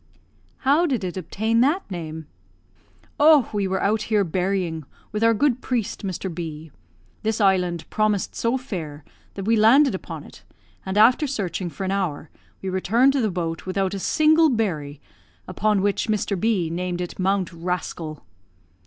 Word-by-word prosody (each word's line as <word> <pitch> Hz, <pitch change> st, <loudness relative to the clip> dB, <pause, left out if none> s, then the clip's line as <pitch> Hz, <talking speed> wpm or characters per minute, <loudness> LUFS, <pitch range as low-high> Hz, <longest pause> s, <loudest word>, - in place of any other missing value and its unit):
"How 300 Hz, +6 st, +4 dB
did 250 Hz, -9 st, -1 dB
it 180 Hz, -2 st, -4 dB
obtain 220 Hz, +6 st, 0 dB
that 300 Hz, +9 st, +2 dB
name?" 160 Hz, -3 st, -6 dB, 0.9 s
"Oh, 295 Hz, -4 st, +6 dB
we 200 Hz, -2 st, 0 dB
were 190 Hz, 0 st, -1 dB
out 215 Hz, +2 st, +1 dB
here 210 Hz, -2 st, +3 dB
berrying, 180 Hz, -2 st, -1 dB, 0.3 s
with 210 Hz, +1 st, -2 dB
our 230 Hz, 0 st, +4 dB
good 255 Hz, +1 st, +1 dB
priest, 235 Hz, -6 st, -2 dB
Mr. 190 Hz, -1 st, -4 dB
B. 160 Hz, -2 st, -7 dB, 0.5 s
This 220 Hz, 0 st, -1 dB
island 180 Hz, -4 st, +1 dB
promised 215 Hz, -2 st, 0 dB
so 235 Hz, +3 st, 0 dB
fair, 165 Hz, -, -6 dB, 0.3 s
that 195 Hz, -, -5 dB
we 225 Hz, +2 st, +3 dB
landed 250 Hz, +6 st, +5 dB
upon -, -, -6 dB
it, -, -, -15 dB, 0.4 s
and, 190 Hz, +2 st, -2 dB
after 250 Hz, +8 st, +5 dB
searching 195 Hz, -8 st, -3 dB
for 195 Hz, -, -7 dB
an 190 Hz, -, -1 dB
hour, 175 Hz, -6 st, -2 dB, 0.3 s
we 190 Hz, -, -2 dB
returned 230 Hz, +8 st, +3 dB
to 275 Hz, -, +1 dB
the 220 Hz, -, +1 dB
boat 170 Hz, -2 st, -4 dB
without 190 Hz, 0 st, -1 dB
a 200 Hz, -, -3 dB
single 315 Hz, -, +4 dB
berry, 160 Hz, -, -2 dB, 0.5 s
upon 210 Hz, -2 st, +1 dB
which 205 Hz, +3 st, 0 dB
Mr. 210 Hz, -2 st, 0 dB
B 195 Hz, -7 st, +1 dB
named 180 Hz, +1 st, -3 dB
it 180 Hz, +1 st, -5 dB
'Mount 190 Hz, -1 st, 0 dB
Rascal.'" 165 Hz, -2 st, -4 dB
195 Hz, 160 wpm, -23 LUFS, 175-230 Hz, 0.9 s, Oh